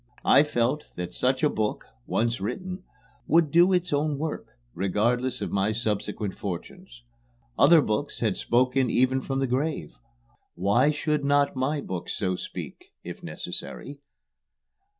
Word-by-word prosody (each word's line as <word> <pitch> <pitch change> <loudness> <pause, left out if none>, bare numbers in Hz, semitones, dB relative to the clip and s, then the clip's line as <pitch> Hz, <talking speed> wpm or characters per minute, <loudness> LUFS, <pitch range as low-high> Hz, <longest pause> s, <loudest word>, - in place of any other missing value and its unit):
I - - +7
felt 145 0 0
that 90 0 -5
such 130 - 0
a - - +6
book, 110 -6 -2 0.2
once 115 -2 0
written, 185 - -4 0.4
would 160 -2 +4
do 175 +4 +5
its 180 -3 +1
own 145 0 +1
work, 155 +1 -4 0.3
regardless 115 - 0
of - - -4
my 100 +2 +1
subsequent 105 -2 -2
fortunes. 120 - -7 0.5
Other 165 -3 +6
books 110 +7 -2
had 110 -5 +1
spoken 130 +1 +2
even 130 +3 +2
from 135 +1 -3
the 135 - +1
grave; 135 +5 -2 0.6
why 105 +10 +3
should 150 0 0
not 140 0 +2
my 140 +3 0
book 90 -7 -5
so 95 -3 -1
speak - - -7 0.2
if - - -8
necessary? 140 0 -6
130 Hz, 140 wpm, -26 LUFS, 110-150 Hz, 0.6 s, I